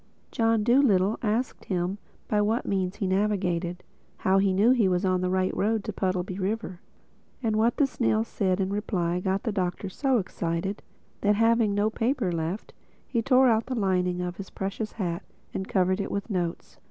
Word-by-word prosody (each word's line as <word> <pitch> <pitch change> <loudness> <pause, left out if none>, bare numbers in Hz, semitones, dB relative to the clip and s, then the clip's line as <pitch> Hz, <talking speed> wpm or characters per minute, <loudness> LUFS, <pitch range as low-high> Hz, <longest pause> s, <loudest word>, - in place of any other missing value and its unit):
John 225 -1 +2
Dolittle 225 -5 +3
asked 230 +3 -1
him 185 +1 -2 0.3
by 210 -1 +2
what 220 +4 0
means 190 -1 -1
he 200 - -2
navigated—how 190 -1 -1
he 195 0 +3
knew 205 +6 +4
he 235 -6 +4
was 180 +1 +1
on 185 -1 +2
the 185 - 0
right 185 0 0
road 220 0 +1
to - - -4
Puddleby 185 0 -2
River. 195 -2 -3 0.6
And 220 -2 +1
what 225 +2 +2
the 285 - +4
snail 110 - +1
said 185 - -1
in 190 0 0
reply 180 -4 -1
got 190 +1 -1
the 230 - -1
Doctor 185 0 -2
so 265 +6 +1
excited, 185 0 -2 0.4
that 205 0 +3
having 225 -1 +3
no 210 +2 +2
paper 230 -4 0
left, 170 +4 -3 0.3
he 235 - 0
tore 260 +2 +5
out 225 -2 +2
the 255 - -2
lining 180 -4 +1
of 180 0 -4
his 195 - -7
precious 200 +3 -4
hat 175 -5 -3 0.3
and 190 - -3
covered 185 +1 +1
it - - -4
with 200 +3 -4
notes. 175 -3 -3
195 Hz, 180 wpm, -27 LUFS, 185-220 Hz, 0.6 s, tore